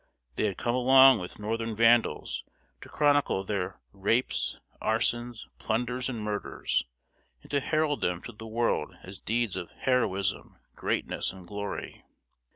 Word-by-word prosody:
They -, -, +1 dB
had 100 Hz, -4 st, -1 dB
come 120 Hz, -, 0 dB
along 130 Hz, 0 st, +7 dB
with 90 Hz, -1 st, -7 dB
Northern 115 Hz, +1 st, -2 dB
vandals, 115 Hz, +1 st, +3 dB, 0.4 s
to -, -, -11 dB
chronicle 145 Hz, -9 st, +2 dB
their 95 Hz, -2 st, -3 dB
rapes, 110 Hz, +6 st, 0 dB, 0.2 s
arsons, 120 Hz, +1 st, 0 dB
plunders, 125 Hz, +3 st, -1 dB
and 115 Hz, -4 st, -4 dB
murders, 105 Hz, -1 st, -1 dB, 0.6 s
and -, -, -14 dB
to 145 Hz, -, +3 dB
herald 155 Hz, +1 st, 0 dB
them 90 Hz, 0 st, -1 dB
to -, -, -7 dB
the 110 Hz, 0 st, -10 dB
world 115 Hz, +1 st, 0 dB
as 95 Hz, +1 st, -8 dB
deeds 115 Hz, -3 st, 0 dB
of 90 Hz, -2 st, -5 dB
heroism, 115 Hz, -7 st, -1 dB, 0.2 s
greatness, -, -, -1 dB
and 95 Hz, -2 st, -12 dB
glory. 100 Hz, +1 st, -5 dB
115 Hz, 140 wpm, -28 LUFS, 100-125 Hz, 0.6 s, along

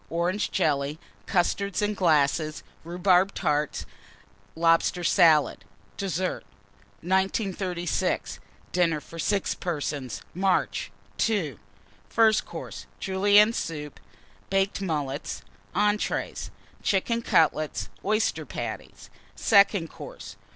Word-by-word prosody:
Orange 175 Hz, +5 st, 0 dB
Jelly. 150 Hz, -4 st, 0 dB, 0.3 s
Custards, 195 Hz, +2 st, 0 dB
in 210 Hz, 0 st, +1 dB
glasses. 155 Hz, -3 st, +2 dB, 0.2 s
Rhubarb 180 Hz, +3 st, +2 dB
Tart. 150 Hz, -3 st, -1 dB, 0.7 s
Lobster 165 Hz, +2 st, +2 dB
Salad. 165 Hz, -4 st, +4 dB, 0.3 s
DESSERT. 185 Hz, -2 st, -2 dB, 0.6 s
1936. 190 Hz, -2 st, -1 dB, 0.3 s
DINNER 170 Hz, -4 st, +2 dB
FOR 165 Hz, +2 st, -11 dB
6 200 Hz, +4 st, 0 dB
PERSONS 145 Hz, -, -4 dB
(March). 190 Hz, +1 st, 0 dB, 0.4 s
II. 165 Hz, -, -1 dB, 0.5 s
FIRST 220 Hz, -2 st, +4 dB
COURSE. -, -, -8 dB
Julienne 205 Hz, +3 st, +4 dB
Soup. 150 Hz, -8 st, -5 dB, 0.5 s
Baked 195 Hz, +1 st, +1 dB
Mullets. 150 Hz, -6 st, -3 dB, 0.3 s
ENTREES. 210 Hz, 0 st, 0 dB, 0.3 s
Chicken 230 Hz, +4 st, +1 dB
Cutlets. 155 Hz, -7 st, +1 dB
Oyster 215 Hz, +2 st, +1 dB
Patties. -, -, -7 dB, 0.2 s
SECOND 200 Hz, -5 st, +4 dB
COURSE. -, -, -10 dB
180 Hz, 90 wpm, -26 LUFS, 155-200 Hz, 0.7 s, Salad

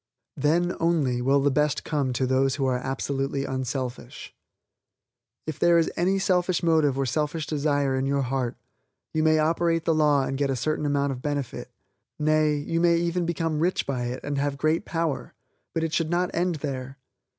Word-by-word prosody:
Then, 170 Hz, +5 st, +1 dB
only, 150 Hz, -7 st, +1 dB
will 135 Hz, +2 st, +3 dB
the 140 Hz, +1 st, +2 dB
best 150 Hz, 0 st, +1 dB
come 145 Hz, -4 st, -1 dB
to 130 Hz, +2 st, 0 dB
those 130 Hz, +1 st, +2 dB
who 140 Hz, -2 st, -1 dB
are 130 Hz, -1 st, +1 dB
absolutely 135 Hz, +1 st, -2 dB
unselfish. 130 Hz, -1 st, -5 dB, 1.1 s
If 155 Hz, -3 st, -5 dB
there 170 Hz, 0 st, +5 dB
is 165 Hz, -, +2 dB
any 185 Hz, +3 st, +1 dB
selfish 185 Hz, -2 st, +1 dB
motive 155 Hz, -5 st, +3 dB
or 135 Hz, -, +1 dB
selfish 150 Hz, +4 st, -1 dB
desire 145 Hz, -2 st, 0 dB
in 130 Hz, +1 st, 0 dB
your 140 Hz, 0 st, +1 dB
heart, 130 Hz, -1 st, -2 dB, 0.6 s
you 155 Hz, -, +1 dB
may 155 Hz, 0 st, +4 dB
operate 165 Hz, +1 st, +1 dB
the 165 Hz, -, +3 dB
law 150 Hz, -3 st, +3 dB
and 135 Hz, +1 st, -3 dB
get 140 Hz, -1 st, +1 dB
a 135 Hz, -, 0 dB
certain 150 Hz, +4 st, -1 dB
amount 140 Hz, -1 st, +1 dB
of 125 Hz, -2 st, -6 dB
benefit, 145 Hz, -3 st, -3 dB, 0.5 s
nay, 155 Hz, 0 st, +2 dB
you 165 Hz, +3 st, -1 dB
may 170 Hz, -1 st, +4 dB
even 170 Hz, 0 st, 0 dB
become 165 Hz, -2 st, -1 dB
rich 175 Hz, +3 st, +1 dB
by 125 Hz, -3 st, -2 dB
it 125 Hz, +2 st, -5 dB
and 145 Hz, -1 st, -2 dB
have 140 Hz, 0 st, -1 dB
great 155 Hz, +3 st, +1 dB
power, 165 Hz, -4 st, -2 dB, 0.4 s
but 165 Hz, -, -1 dB
it 165 Hz, -1 st, -2 dB
should 165 Hz, -2 st, 0 dB
not 175 Hz, +1 st, 0 dB
end 175 Hz, 0 st, 0 dB
there. 135 Hz, -1 st, -5 dB
145 Hz, 185 wpm, -25 LUFS, 135-165 Hz, 1.1 s, there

